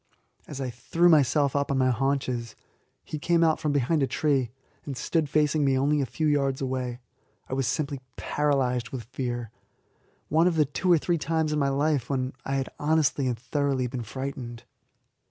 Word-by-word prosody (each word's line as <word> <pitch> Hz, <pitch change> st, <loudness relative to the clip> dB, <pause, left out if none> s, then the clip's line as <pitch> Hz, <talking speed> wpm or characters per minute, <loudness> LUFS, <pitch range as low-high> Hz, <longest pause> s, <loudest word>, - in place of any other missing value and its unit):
As 145 Hz, -, -7 dB
I 130 Hz, -2 st, -3 dB
threw 165 Hz, +9 st, +2 dB
myself 145 Hz, -2 st, +4 dB
up 140 Hz, 0 st, +1 dB
on 140 Hz, -, +1 dB
my 130 Hz, -1 st, +3 dB
haunches, 130 Hz, -2 st, -1 dB, 0.5 s
he 155 Hz, -, -5 dB
came 170 Hz, +2 st, +2 dB
out 160 Hz, -1 st, +3 dB
from 150 Hz, -, 0 dB
behind 145 Hz, +3 st, +1 dB
a 135 Hz, -, +2 dB
tree, 135 Hz, -6 st, +1 dB, 0.3 s
and 140 Hz, -3 st, -6 dB
stood 160 Hz, 0 st, 0 dB
facing 150 Hz, 0 st, +2 dB
me 135 Hz, -1 st, +3 dB
only 145 Hz, +2 st, +2 dB
a 135 Hz, -, -1 dB
few 155 Hz, -, -2 dB
yards 140 Hz, -3 st, +1 dB
away. 130 Hz, -2 st, -2 dB, 0.5 s
I -, -, -5 dB
was 135 Hz, -2 st, 0 dB
simply 140 Hz, -1 st, -2 dB
paralyzed 130 Hz, -5 st, 0 dB
with 125 Hz, -3 st, -5 dB
fear 120 Hz, -1 st, -4 dB, 0.8 s
one 160 Hz, +3 st, +3 dB
of 180 Hz, -, +1 dB
the 155 Hz, -2 st, +4 dB
two 170 Hz, +6 st, 0 dB
or 170 Hz, -, +7 dB
three 170 Hz, +2 st, 0 dB
times 160 Hz, +1 st, 0 dB
in 150 Hz, -, +1 dB
my 140 Hz, -1 st, +2 dB
life 140 Hz, -2 st, 0 dB
when 130 Hz, -1 st, -1 dB
I 135 Hz, -, -1 dB
have 135 Hz, -1 st, 0 dB
been -, -, -13 dB
honestly 155 Hz, -3 st, +2 dB
and 120 Hz, -2 st, -1 dB
thoroughly 135 Hz, +1 st, -1 dB
frightened. 125 Hz, 0 st, -5 dB
140 Hz, 190 wpm, -27 LUFS, 130-150 Hz, 0.8 s, or